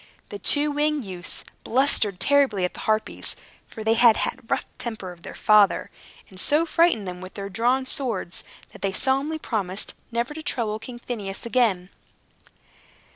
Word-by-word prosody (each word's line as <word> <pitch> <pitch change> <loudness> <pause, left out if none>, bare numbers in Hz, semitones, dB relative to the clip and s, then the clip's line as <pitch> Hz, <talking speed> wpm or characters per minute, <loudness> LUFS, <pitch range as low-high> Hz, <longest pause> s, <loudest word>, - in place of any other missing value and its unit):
The 410 - -7
two 295 -4 +4
winged 295 -2 0
youths 180 -3 -2 0.2
blustered 225 -6 +2
terribly 265 -6 +3
at 180 - -4
the - - -10
Harpies 215 0 -1 0.3
(for 220 - -8
they 220 +1 +3
had 230 -1 +7
the - - +1 0.2
rough - - 0
temper 220 -6 -5
of 175 -1 -14
their - - -9
father), 210 -2 +4 0.4
and 185 -1 -5
so 300 +3 +3
frightened 330 - +2
them 180 0 -6
with 185 0 -10
their 200 -1 -5
drawn 245 +6 +1
swords, 230 -10 -2 0.3
that - - -14
they 195 0 -1
solemnly 270 +8 +1
promised 200 -9 -3 0.2
never 235 +5 -1
to 315 - -7
trouble 220 -7 -2
King 240 +2 -9
Phineus 210 -5 -6
again. 220 -7 +1
225 Hz, 165 wpm, -24 LUFS, 195-270 Hz, 0.4 s, had